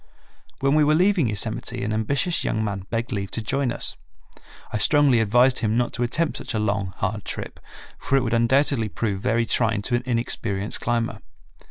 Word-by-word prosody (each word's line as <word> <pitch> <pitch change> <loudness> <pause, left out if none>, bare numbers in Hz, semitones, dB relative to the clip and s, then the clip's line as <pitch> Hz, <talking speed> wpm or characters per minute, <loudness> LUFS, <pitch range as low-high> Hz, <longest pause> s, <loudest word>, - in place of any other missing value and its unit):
When 135 +1 +2
we 155 0 +4
were 150 +1 +3
leaving 180 - +3
Yosemite 105 -1 -1
an 105 +1 -2
ambitious 140 +10 0
young 110 - -1
man 100 -2 -4
begged 115 +1 -2
leave 100 -3 -3
to 115 - -4
join 135 +2 0
us. - - -3 0.8
I 110 - 0
strongly 145 -2 +4
advised 120 +4 +3
him 110 0 0
not 120 -1 0
to - - -4
attempt 150 +7 0
such - - -6
a - - +1
long, 100 -3 -1
hard 105 +2 -2
trip, - - -5 0.4
for - - 0
it 135 - +1
would 115 -2 -2
undoubtedly 115 0 +2
prove 100 +2 -3
very 115 +3 +1
trying 110 -3 +1
to 120 - -3
an 120 - 0
inexperienced 115 -4 -1
climber. 115 -1 -1
115 Hz, 190 wpm, -23 LUFS, 105-130 Hz, 0.8 s, we